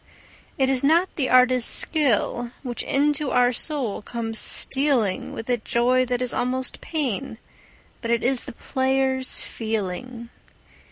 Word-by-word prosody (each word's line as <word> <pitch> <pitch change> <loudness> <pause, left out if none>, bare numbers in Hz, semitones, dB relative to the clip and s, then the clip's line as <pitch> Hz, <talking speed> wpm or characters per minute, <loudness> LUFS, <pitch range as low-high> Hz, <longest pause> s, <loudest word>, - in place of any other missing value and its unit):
It 265 - +2
is 265 -1 +1
not 335 +6 +2
the 270 -4 -1
artist's 255 -1 +4
skill 245 -5 +1
which 245 -3 -5
into 290 0 0
our 250 0 +2
soul 255 -6 -2
comes 225 0 -3
stealing 265 -8 +1
With 225 - -8
a 245 -1 +1
joy 245 +3 +1
that 250 0 -2
is 250 - -2
almost 255 +1 -2
pain, 270 -6 -4 0.6
but 230 - -5
it 235 0 0
is 255 0 +1
the - - -9
player's 265 0 +1
feeling. 225 +2 -5
255 Hz, 135 wpm, -23 LUFS, 235-270 Hz, 0.6 s, artist's